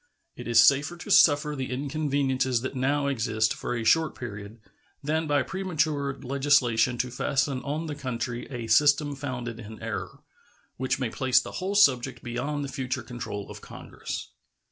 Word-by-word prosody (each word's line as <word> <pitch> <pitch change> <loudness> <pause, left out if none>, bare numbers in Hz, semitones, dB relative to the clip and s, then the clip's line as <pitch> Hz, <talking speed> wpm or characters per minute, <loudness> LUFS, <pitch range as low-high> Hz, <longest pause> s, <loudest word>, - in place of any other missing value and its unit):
It - - -8
is 120 -1 +5
safer 145 +8 +4
to 200 - -7
suffer 150 -3 +5
the 130 -2 -4
inconveniences 135 -2 0
that 130 - -4
now 140 +2 +1
exist 115 -5 +1
for 125 - -4
a 115 - -2
short 160 +7 +3
period 105 -2 -8 0.4
than 155 +2 0
by 145 -2 +2
premature 155 -5 -1
legislation 130 -3 +2
to 125 +1 -2
fasten 135 +1 0
on 150 +5 -3
the 155 - -4
country 125 -4 -4
a 120 -4 -5
system 145 +4 +4
founded 125 -4 -5
in 110 -1 -9
error, 100 -5 -5 0.6
which 130 +1 0
may 125 -4 -2
place 130 -2 +3
the - - -7
whole 195 +2 -2
subject 130 - +3
beyond 140 +5 -3
the 135 - -8
future 130 -1 -3
control 120 -5 -6
of - - -10
Congress. - - -7
130 Hz, 165 wpm, -27 LUFS, 120-145 Hz, 0.6 s, is